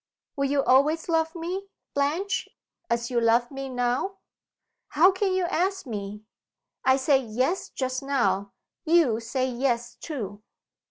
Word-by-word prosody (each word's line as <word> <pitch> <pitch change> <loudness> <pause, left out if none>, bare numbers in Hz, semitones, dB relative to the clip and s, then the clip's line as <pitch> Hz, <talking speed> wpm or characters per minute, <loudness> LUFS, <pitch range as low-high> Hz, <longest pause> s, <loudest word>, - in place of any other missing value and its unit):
"Will 275 - 0
you 280 -1 +2
always 295 +5 +3
love 325 -1 +1
me, 360 +4 -4 0.3
Blanche, 335 +8 0 0.4
as 235 +1 -1
you 240 -1 +2
love 235 +2 +3
me 270 0 -5
now?" 250 +10 -1 0.7
"How 345 +6 +5
can 380 +1 0
you 370 0 +1
ask 375 +2 0
me!" 210 -3 -6 0.6
"I 260 0 +5
said 270 -1 +2
Yes 255 - 0
just 260 0 -2
now. 200 -8 0 0.3
You 315 -9 +4
say 245 +3 -1
Yes 240 -1 -1
too." 210 - -6
270 Hz, 140 wpm, -26 LUFS, 240-330 Hz, 0.7 s, How